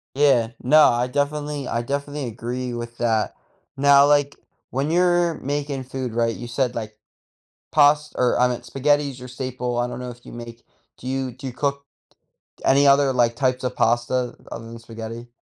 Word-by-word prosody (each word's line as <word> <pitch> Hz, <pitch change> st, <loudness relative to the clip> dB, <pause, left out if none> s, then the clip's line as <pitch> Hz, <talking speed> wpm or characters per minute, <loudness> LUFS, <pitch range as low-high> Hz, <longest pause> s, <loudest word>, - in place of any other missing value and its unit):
Yeah, 130 Hz, -5 st, +3 dB
no, 155 Hz, +5 st, +6 dB
I 120 Hz, +1 st, +3 dB
definitely, 145 Hz, +1 st, -2 dB
I 115 Hz, +1 st, -1 dB
definitely 140 Hz, +2 st, -3 dB
agree 120 Hz, +2 st, -4 dB
with 120 Hz, 0 st, -6 dB
that. 115 Hz, -2 st, +1 dB, 0.4 s
Now, 140 Hz, 0 st, +6 dB
like, 145 Hz, -1 st, +2 dB, 0.3 s
when 135 Hz, +4 st, -1 dB
you're 175 Hz, -1 st, +3 dB
making 140 Hz, -1 st, -3 dB
food 130 Hz, -2 st, -5 dB
right, 115 Hz, -1 st, +1 dB
you 120 Hz, -, -7 dB
said 125 Hz, 0 st, -1 dB
like 110 Hz, -2 st, -6 dB, 0.7 s
past 150 Hz, 0 st, +4 dB
or 125 Hz, -1 st, +2 dB
I 125 Hz, -, +5 dB
meant 120 Hz, -1 st, -4 dB
spaghetti's 140 Hz, +1 st, 0 dB
your 125 Hz, 0 st, -9 dB
staple, 125 Hz, -1 st, -4 dB
I 120 Hz, -, +1 dB
don't 125 Hz, -, -6 dB
know 125 Hz, -, -5 dB
if 120 Hz, 0 st, -13 dB
you -, -, -11 dB
make 120 Hz, 0 st, -9 dB, 0.3 s
do 125 Hz, -, -12 dB
you, 130 Hz, -1 st, -2 dB
do 130 Hz, +3 st, -9 dB
you 130 Hz, -, -4 dB
cook 140 Hz, +2 st, -2 dB, 0.8 s
any 140 Hz, +1 st, +4 dB
other 140 Hz, 0 st, +5 dB
like 120 Hz, -2 st, +2 dB
types 130 Hz, -2 st, 0 dB
of 125 Hz, -, -2 dB
pasta 120 Hz, +1 st, +1 dB
other 115 Hz, 0 st, -7 dB
than 115 Hz, 0 st, -9 dB
spaghetti? 115 Hz, +1 st, -8 dB
130 Hz, 180 wpm, -23 LUFS, 120-140 Hz, 0.8 s, no